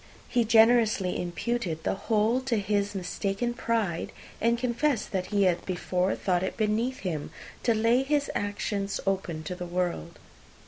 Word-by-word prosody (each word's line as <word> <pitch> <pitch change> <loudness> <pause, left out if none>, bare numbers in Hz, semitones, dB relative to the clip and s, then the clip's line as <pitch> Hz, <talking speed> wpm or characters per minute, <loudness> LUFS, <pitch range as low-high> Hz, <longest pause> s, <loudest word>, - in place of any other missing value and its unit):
He 240 -2 +2
generously 220 -4 +4
imputed 175 -2 -2
the - - +1
whole 220 +4 +1
to 240 -4 +1
his 205 0 0
mistaken 195 +5 -2
pride, 225 -8 -1 0.3
and 235 +1 +3
confessed 245 0 0
that 185 -2 -1
he 205 -1 +2
had 180 -2 +2
before 180 0 0
thought 180 -3 0
it 190 - -3
beneath 225 +4 0
him 160 -6 -3 0.3
to 230 - +2
lay 230 +3 +3
his 285 +1 +1
private 205 - 0
actions 200 -1 -2
open 185 -5 -1
to 170 - -4
the 180 0 -6
world. 175 - -2
205 Hz, 155 wpm, -28 LUFS, 180-235 Hz, 0.3 s, generously